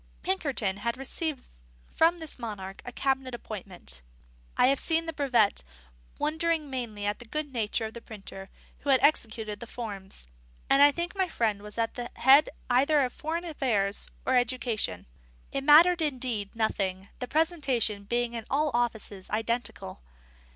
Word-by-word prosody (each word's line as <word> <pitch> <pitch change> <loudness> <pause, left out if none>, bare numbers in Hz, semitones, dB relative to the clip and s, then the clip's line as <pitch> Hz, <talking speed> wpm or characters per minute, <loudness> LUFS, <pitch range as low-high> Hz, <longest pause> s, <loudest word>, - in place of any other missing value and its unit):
Pinkerton 275 - 0
had 235 +4 -2
received 275 +2 -3 0.5
from 335 +2 +3
this 320 -5 -5
monarch 195 -5 -6
a 245 - -7
cabinet 265 0 -1
appointment; 185 - -7 0.6
I - - +6
have 275 +1 +3
seen 330 0 +2
the 325 - -4
brevet, 250 - +2 0.5
wondering 315 -1 0
mainly 225 -6 -4
at 205 0 -1
the 240 - -10
good 290 +3 -4
nature 225 -1 -1
of 220 - -6
the 235 - -8
printer 195 -4 -9 0.3
who 285 - -5
had 265 -1 +6
executed 220 -7 +1
the 235 - -8
forms, 200 - -8 0.4
and 275 +1 +6
I 290 0 +8
think 345 +6 -3
my 380 -2 0
friend 220 - 0
was 210 +1 -9
at 230 -1 0
the 240 -1 -5
head 275 +4 +6 0.2
either 280 +4 +4
of 255 -2 0
foreign 330 +3 -3
affairs 225 - 0 0.2
or 260 - +2
education: 240 - 0 0.5
it 275 - -2
mattered, 330 +4 +7
indeed, 250 -9 -1
nothing, 195 -4 -1
the 250 - -4
presentation 270 - +1
being 240 +2 0
in 230 -2 -5
all 295 +2 +1
offices 220 -5 -2
identical. 225 - -2
245 Hz, 160 wpm, -28 LUFS, 210-290 Hz, 0.6 s, I